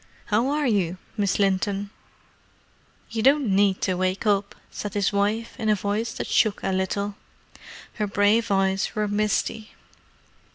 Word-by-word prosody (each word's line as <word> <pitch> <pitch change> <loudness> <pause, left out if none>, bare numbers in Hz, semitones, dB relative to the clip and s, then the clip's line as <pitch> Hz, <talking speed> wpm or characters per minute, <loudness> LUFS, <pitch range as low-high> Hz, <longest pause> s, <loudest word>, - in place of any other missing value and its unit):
How 230 +5 +3
are 295 +1 0
you, 190 -7 +1 0.2
Miss 200 -3 0
Linton?" 200 0 0 1.2
"You 225 -1 -2
don't 275 +2 +4
need 195 -1 +3
to 185 - +1
wake 185 +3 -1
up," 200 -1 +1 0.2
said 210 0 -6
his 200 0 +1
wife, 210 +3 0
in 220 -2 0
a 210 - +4
voice 205 +3 -2
that - - -4
shook 215 -2 +1
a 195 - 0
little. 195 +2 -1 0.8
Her 210 -2 -2
brave 205 +3 +2
eyes 195 0 +1
were 210 0 0
misty. 215 +1 -1
205 Hz, 150 wpm, -24 LUFS, 195-215 Hz, 1.2 s, don't